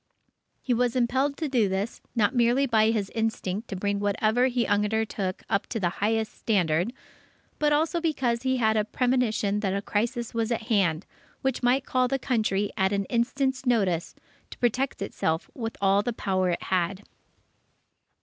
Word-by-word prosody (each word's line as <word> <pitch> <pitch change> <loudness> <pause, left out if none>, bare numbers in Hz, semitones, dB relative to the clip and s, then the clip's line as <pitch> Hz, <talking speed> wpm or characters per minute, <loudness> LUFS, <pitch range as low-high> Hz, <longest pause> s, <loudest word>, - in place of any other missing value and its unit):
He 255 - +1
was 245 0 +1
impelled 260 +3 +1
to 315 - -2
do 240 -7 +2
this, 195 +4 -3
not 215 -3 +2
merely 245 +2 +3
by 220 -4 +3
his 210 -4 -1
instinct 220 -1 -2
to 195 - -5
bring 200 +1 -1
whatever 215 +5 +2
he 245 -2 0
undertook 205 -2 -1
up 200 - 0
to 225 - -3
the 180 -4 +1
highest 220 +1 0
standard, 180 -2 +1 0.7
but 300 0 +2
also 320 +3 +1
because 255 -8 0
he 260 0 +1
had 220 -2 +2
a 215 - +3
premonition 220 -3 0
that 195 -2 -1
a 200 - -1
crisis 235 +3 -2
was 230 0 -1
at 230 - -1
hand, 185 -6 +2 0.4
which 265 -2 0
might 255 +2 +2
call 255 -1 +1
the 270 - 0
Country, 215 -6 0
at 190 -2 +1
an 200 -1 0
instant's 260 +2 0
notice, 195 -9 +1 0.3
to - - -10
protect 250 -1 0
itself 160 -4 -2
with 225 -2 -5
all 195 0 +3
the 240 +3 -2
power 185 -4 0
it 170 - -2
had. 185 +2 -1
225 Hz, 170 wpm, -26 LUFS, 200-250 Hz, 0.7 s, merely